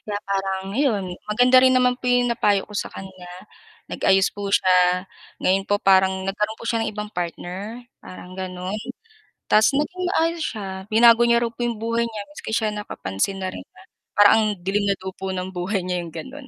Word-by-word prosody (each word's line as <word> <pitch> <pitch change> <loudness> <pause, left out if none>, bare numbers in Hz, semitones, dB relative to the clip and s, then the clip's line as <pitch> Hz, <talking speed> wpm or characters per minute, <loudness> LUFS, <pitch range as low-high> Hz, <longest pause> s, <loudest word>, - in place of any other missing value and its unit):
Kaya 205 -1 -4
parang, 195 -1 -1
'yun, 235 -7 +1 0.2
maganda 250 +4 +5
rin 260 0 +5
naman 250 0 +3
po 250 - -2
'yung 245 -1 +3
napayo 205 -4 +1
ko 210 - -13
sa - - -2
kanya. 185 -2 -10 0.6
Nag-ayos 195 0 +2
po 205 -1 -5
siya, 180 -1 +3 0.4
ngayon 195 +1 +2
po 205 - +3
parang 190 0 +3
nagkaroon 210 +3 -2
po - - -10
siya 230 0 0
ng 220 - -2
ibang 210 0 -6
partner, 180 +6 -5 0.2
parang, 185 0 -11
ganun, 185 +2 -4 0.7
ta's 215 +1 +5
naging 360 +6 -2
maayos 335 -2 0
siya, 210 -8 -4 0.2
binago 230 +1 +6
niya 235 0 +3
raw 235 - -1
po 240 - -5
'yung 235 -2 -2
buhay 230 +1 0
niya 220 -2 -6
maski 200 - -8
siya 220 -1 +1
nakapansin 195 - -3
na 185 -1 -3
rin - - -8
na, - - -18 0.4
parang 205 0 +8
ang 220 -1 +3 0.2
dilim 195 +3 0
na 200 - +2
daw 190 0 -5
po 190 0 -5
ng 185 0 -4
buhay 185 +2 -2
niya 180 -1 -2
'yung 170 - -9
gano'n. 270 +1 -9
205 Hz, 195 wpm, -22 LUFS, 190-230 Hz, 0.7 s, parang